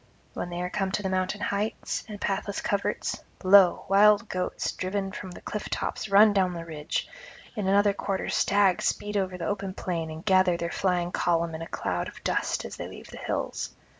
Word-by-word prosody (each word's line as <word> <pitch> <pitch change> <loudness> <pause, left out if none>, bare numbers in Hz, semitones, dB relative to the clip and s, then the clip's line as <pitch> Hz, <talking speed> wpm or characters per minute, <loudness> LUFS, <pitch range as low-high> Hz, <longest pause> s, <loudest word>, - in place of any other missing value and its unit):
When 175 - -4
they 175 0 -4
are 180 - -2
come 195 -2 -1
to 205 - -1
the 190 - -1
mountain 185 +2 -1
heights 205 +2 -2
and 210 -1 -7
pathless 200 0 -2
coverts, 200 -1 -1 0.2
lo, 190 -1 +6
wild 210 +2 +5
goats 185 -1 -2
driven 195 +1 -3
from 190 -1 -7
the 180 - -10
cliff 210 - -5
tops - - -3
run 205 +2 +7
down 185 -2 +2
the 165 0 -6
ridge; 150 -2 -3 0.5
in 210 -4 -2
another 200 +1 +4
quarter 195 -1 -2
stags 200 -2 +3
speed 210 0 -1
over 185 -2 0
the 175 - -4
open 195 -2 -3
plain 165 -3 -3
and 160 +1 -8
gather 185 -3 +4
their 170 0 -3
flying 180 -2 0
column 170 -2 +1
in 160 - -5
a 165 - -5
cloud - - -2
of - - -11
dust - - 0
as - - -7
they - - -5
leave - - -11
the - - -9
hills. - - -3
190 Hz, 200 wpm, -27 LUFS, 180-200 Hz, 0.5 s, run